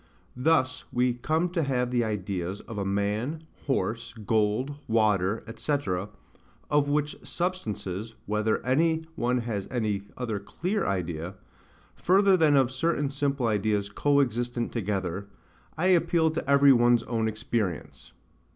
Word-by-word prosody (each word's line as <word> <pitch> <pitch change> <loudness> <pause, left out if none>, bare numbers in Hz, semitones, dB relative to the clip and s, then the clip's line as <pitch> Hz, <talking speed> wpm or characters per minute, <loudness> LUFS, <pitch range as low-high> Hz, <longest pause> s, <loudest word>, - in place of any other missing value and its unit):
Thus 130 -1 +2
we 125 0 +2
come 155 +8 0
to 170 -1 -1
have 125 -4 0
the 120 -1 +2
ideas 100 -3 -3
of 110 -3 -7
a - - 0
man, 105 +10 -1 0.2
horse, 115 -2 -1
gold, 110 +5 0
water, 105 -2 +2
&c. 145 +5 +1 0.9
of 145 -1 +3
which 150 0 0
substances, 115 - -3
whether 105 +1 0
any 160 +5 +2
one 125 -4 0
has 110 -5 -3
any 110 -5 -1 0.2
other 115 -5 -2
CLEAR 180 - -2
idea, 90 -1 -3 0.6
further 195 +1 +4
than 155 -5 +4
of 130 -2 +3
certain 145 +1 0
simple 140 -2 -1
ideas 105 -2 0
co 145 +6 +3
existent 120 -1 -1
together, 100 -3 -2 0.5
I 165 - 0
appeal 170 -2 +3
to 160 -3 -4
every 140 0 +7
one's 120 -1 +4
own 115 -2 -1
experience. 110 -5 -3
120 Hz, 135 wpm, -27 LUFS, 105-145 Hz, 0.9 s, every